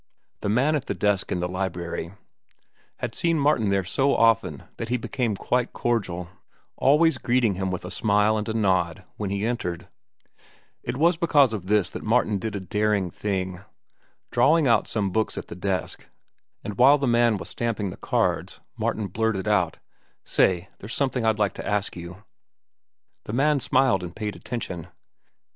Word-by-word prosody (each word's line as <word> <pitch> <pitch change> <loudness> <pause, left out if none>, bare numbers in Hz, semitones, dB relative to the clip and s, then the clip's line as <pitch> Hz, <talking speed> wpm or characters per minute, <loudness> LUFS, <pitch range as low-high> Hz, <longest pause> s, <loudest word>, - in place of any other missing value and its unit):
The 100 - -2
man 135 +8 +3
at 140 -3 -3
the - - -2
desk 105 -3 0
in 90 - -1
the 90 - 0
library 90 -1 -4 0.8
had - - -4
seen 165 -1 +1
Martin 140 -8 +2
there 100 -1 +1
so 135 +10 +1
often 115 0 +2
that 115 - -4
he 125 - +1
had 125 - -3
become 120 -6 -1
quite 125 +5 -1
cordial, 95 -7 -1 0.5
always 155 +4 +4
greeting 120 -4 +2
him 95 +1 -2
with 90 -1 -4
a 90 - -5
smile 105 +3 +2
and 105 0 -2
a - - -1
nod 95 -6 +1
when 105 -2 -3
he 100 +1 -1
entered. 90 -8 -3 0.9
It 125 - -4
was 165 +3 +3
because 145 -8 +4
of 95 -4 -5
this 105 -3 +2
that - - -6
Martin 110 -2 +1
did 110 +1 -4
a - - -2
daring 105 -1 0
thing. 95 -3 -3 0.7
Drawing 155 0 +4
out 115 -3 +3
some 100 -4 -1
books 110 +3 0
at - - -6
the - - -7
desk, 95 +1 -3 0.6
and 100 -1 -6
while 135 +4 +7
the 140 - -1
man 120 -2 +3
was - - -6
stamping 110 -5 -2
the - - -8
cards, - - -1 0.2
Martin 110 - -1
blurted 110 -1 -1
out: 95 -6 +1 0.5
"Say, 90 +1 +2
there's 105 +4 -6
something 130 -4 0
I'd 110 -1 +2
like 105 -2 +1
to - - -7
ask 105 -1 -1
you." 90 +3 -9 1.0
The 105 - -6
man 145 +3 +3
smiled 130 -7 +2
and 90 0 -7
paid 105 -2 -4
attention. 90 -9 -5
105 Hz, 175 wpm, -25 LUFS, 95-120 Hz, 1.0 s, while